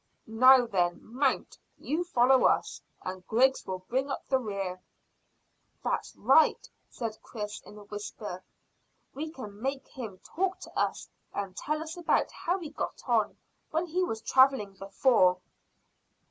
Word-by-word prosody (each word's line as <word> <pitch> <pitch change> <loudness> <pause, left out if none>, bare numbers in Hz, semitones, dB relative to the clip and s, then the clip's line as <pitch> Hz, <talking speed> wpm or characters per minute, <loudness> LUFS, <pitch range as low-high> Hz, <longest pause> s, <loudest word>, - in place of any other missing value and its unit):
"Now 250 +3 +6
then, 175 -5 +1
mount. 260 +4 -1 0.2
You 315 +5 -1
follow 260 -5 +4
us, - - +2 0.2
and 185 0 -5
Griggs 260 +4 +3
will 185 -1 -5
bring 265 +3 0
up - - -4
the 265 - +2
rear." 195 -5 -4 1.0
"That's - - -2
right," - - +4 0.2
said 225 -3 -5
Chris 210 -2 -6
in 210 - -13
a 210 - -11
whisper. 205 -2 -7 0.7
"We 310 +3 -4
can 215 -9 -9
make 270 +1 -3
him 225 -8 -7
talk 375 +2 -2
to - - -11
us - - -1 0.3
and 195 -2 -3
tell 305 +7 -2
us 320 +2 -8
about 345 - +1
how 355 +3 -1
he 330 -6 -7
got - - -5
on - - +2 0.3
when 320 +3 0
he 355 +2 0
was 225 -11 -3
travelling 260 -7 +4
before." 195 -1 +3
245 Hz, 145 wpm, -29 LUFS, 200-275 Hz, 1.0 s, Now